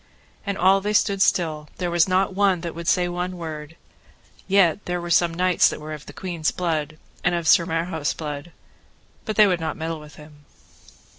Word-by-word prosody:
And 200 -1 -1
all 190 +2 +4
they 210 +2 -1
stood 200 -2 +2
still, 155 -5 +1
there 175 -2 -2
was 170 0 +3
not 190 +1 +2
one 195 -3 +2
that 170 -1 -5
would 170 0 -7
say 180 -1 +3
one 180 +1 -4
word; 155 -2 -7 0.7
yet 190 -4 +4
were - - -26 0.2
there 175 0 -6
some 170 0 +4
knights 180 +1 +3
that - - -6
were 155 +1 -7
of 150 -1 -9
the - - -8
queen's 170 -4 -2
blood, 155 -4 -2 0.3
and 175 0 +2
of 170 -2 -2
Sir 170 +3 +5
Marhaus' 165 -2 -2
blood, 150 +1 -6 0.7
but 215 - -3
they 215 - +7
would 180 -3 +1
not 160 -1 -3
meddle 160 0 -4
with 150 0 -13
him. 150 -1 -16
170 Hz, 200 wpm, -23 LUFS, 155-185 Hz, 0.7 s, they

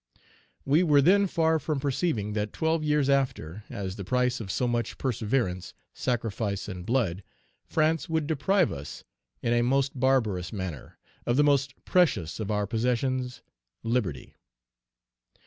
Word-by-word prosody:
"We 145 +5 +4
were 150 -5 +5
then 200 +5 +5
far 160 -3 +2
from 150 0 -2
perceiving 135 - -1
that 105 -1 -2
twelve 160 0 0
years 150 -2 +2
after, 120 - 0
as 95 0 -5
the 100 - -5
price 125 +4 +1
of 100 - -7
so 125 - 0
much 120 -1 -1
perseverance, 110 -7 -1 0.2
sacrifice, 110 -4 -2
and 90 -3 -7
blood, 110 -8 +1 0.5
France 160 +2 +1
would 160 -2 0
deprive 170 +4 +2
us 70 +1 -7 0.4
in 120 - +2
a 120 - +3
most 135 +2 +1
barbarous 115 -10 +1
manner 95 -8 -6 0.3
of 120 +1 +2
the 145 - +6
most 140 -2 +2
precious 160 - +2
of 110 -2 -3
our 105 -1 +1
possessions, 125 +2 -1 0.4
liberty. 115 - -2
125 Hz, 145 wpm, -27 LUFS, 105-145 Hz, 0.5 s, the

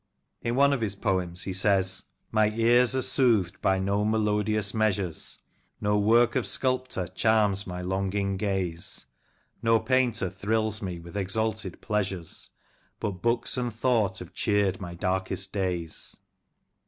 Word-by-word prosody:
In 120 +1 -1
one 140 +1 +5
of 135 - -1
his 100 -3 -1
poems 90 -3 -1
he 95 - -3
says: 95 -1 +1
— - - -45
My 110 -1 +3
ears 120 +3 +4
are 130 - +2
soothed 115 -11 +3
by 95 0 +3
no 100 +2 0
melodious 105 -1 +1
measures, 105 -6 -1 0.4
No 105 0 +1
work 115 +3 +4
of - - 0
sculptor 130 -7 0
charms 105 -1 +2
my 90 -1 -5
longing 100 +1 -1
gaze, 95 -4 -2 0.6
No 115 -1 +4
painter 125 -6 +1
thrills 110 +2 -1
me 90 -3 -4
with 85 +3 -12
exalted 105 0 -1
pleasures, 95 -5 -3 0.5
But 95 -4 -4
books 120 +2 0
and 120 -1 -1
thought 110 -5 +1
have 90 - -7
cheered 100 -3 +1
my 85 -2 -6
darkest 95 +2 -2
days. 90 -5 -3
100 Hz, 140 wpm, -27 LUFS, 95-110 Hz, 0.6 s, one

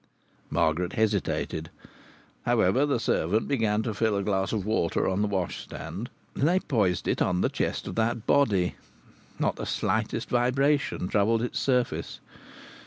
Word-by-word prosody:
Margaret 85 +3 +1
hesitated. 100 -6 -1 0.7
However, 120 +3 +3
the 140 -4 +1
servant 105 +1 +1
began 110 -5 +1
to 110 - -2
fill 105 0 +1
a 100 - -1
glass 95 -1 0
of 105 -4 -2
water 105 -6 +1
on 95 +2 0
the 105 - +2
washstand, 100 +4 -4 0.2
and 140 - +1
they 180 +3 +3
poised 100 - 0
it - - 0
on 90 0 +2
the - - +2
chest - - -2
of - - -4
that 115 0 0
body. 100 -11 +3 0.6
Not - - 0
the - - -4
slightest - - -1
vibration 130 -2 +1
troubled 110 +4 +2
its 120 - -2
surface. 125 -2 0
110 Hz, 150 wpm, -27 LUFS, 95-120 Hz, 0.7 s, However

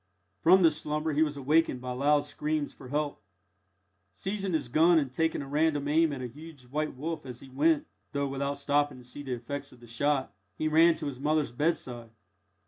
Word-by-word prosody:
From 185 +2 +6
this 160 -2 +5
slumber 150 +1 -1
he 150 - +2
was 150 -2 +1
awakened 145 0 +2
by 125 0 -5
loud 145 +3 +3
screams 150 0 -2
for 130 - -12
help. 145 -2 -2 0.9
Seizing 195 - -3
his 155 -6 0
gun, 165 +7 +5
and 140 -5 0
taking 160 0 0
a - - -9
random 145 0 +1
aim 160 +1 +3
at 135 -3 -5
a - - -3
huge 150 +2 -12
white 150 +5 -3
wolf 160 +5 -4
as 125 -2 -8
he 135 - -12
went 150 +4 +2 0.3
(though 140 -1 -1
without 140 +1 -2
stopping 145 -1 +1
to 125 - -13
see 125 +4 -9
the 135 -3 -4
effects 135 +4 -5
of 125 - -17
the 120 - -14
shot), 130 0 0 0.2
he 155 - 0
ran 165 +2 +5
to 160 -1 -6
his 135 -3 -5
mother's 150 -2 +1
bedside. 120 -4 -2
145 Hz, 205 wpm, -29 LUFS, 130-155 Hz, 0.9 s, From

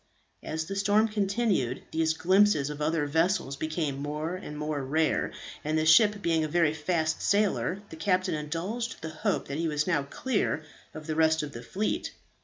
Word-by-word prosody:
As 160 0 -3
the 195 - -5
storm 205 +2 +3
continued, 200 - 0
these 160 0 +1
glimpses 185 -5 +3
of 150 0 -7
other 155 0 +1
vessels 160 -1 +1
became 155 -2 -2
more 150 +3 -3
and 165 -5 -7
more 150 -2 -2
rare, 155 +4 +1 0.3
and 155 +1 0
the 155 - +1
ship 205 +6 +5
being 165 -2 +2
a - - 0
very 160 -1 +2
fast 160 0 -1
sailer, 200 -1 +1
the - - -7
captain 185 +2 +1
indulged 165 +10 -4
the 160 - -3
hope 195 +6 -2
that 140 +2 -4
he 165 - 0
was 150 -1 0
now 165 -5 +1
clear 155 - -1 0.3
of 155 -1 -8
the 155 - -2
rest 160 0 +3
of 145 - -5
the 115 - -8
fleet. 185 - -2
160 Hz, 185 wpm, -28 LUFS, 150-190 Hz, 0.3 s, ship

